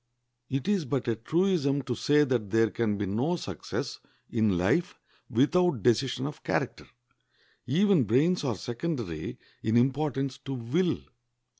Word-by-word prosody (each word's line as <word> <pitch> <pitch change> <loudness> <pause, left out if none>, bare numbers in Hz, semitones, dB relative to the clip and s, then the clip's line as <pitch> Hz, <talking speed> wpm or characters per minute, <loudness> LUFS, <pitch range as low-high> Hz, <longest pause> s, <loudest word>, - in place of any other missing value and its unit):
It 135 0 -2
is 200 -6 +1
but 130 -1 -2
a 115 - +1
truism 145 - +1
to 125 - -2
say 145 +4 +3
that 125 -7 0
there 115 +1 +3
can 110 -3 0
be 100 - -1
no 120 - 0
success 95 - -5 0.3
in 110 -5 +2
life 95 - +1 0.3
without 140 - +2
decision 125 +2 +2
of 150 0 -6
character. - - -2 0.8
Even 175 - +4
brains 150 - +2
are 125 -6 0
secondary 120 - -4 0.2
in 110 +2 +2
importance 135 +1 0
to 135 - -5
will. 155 +9 0
130 Hz, 140 wpm, -28 LUFS, 115-155 Hz, 0.8 s, Even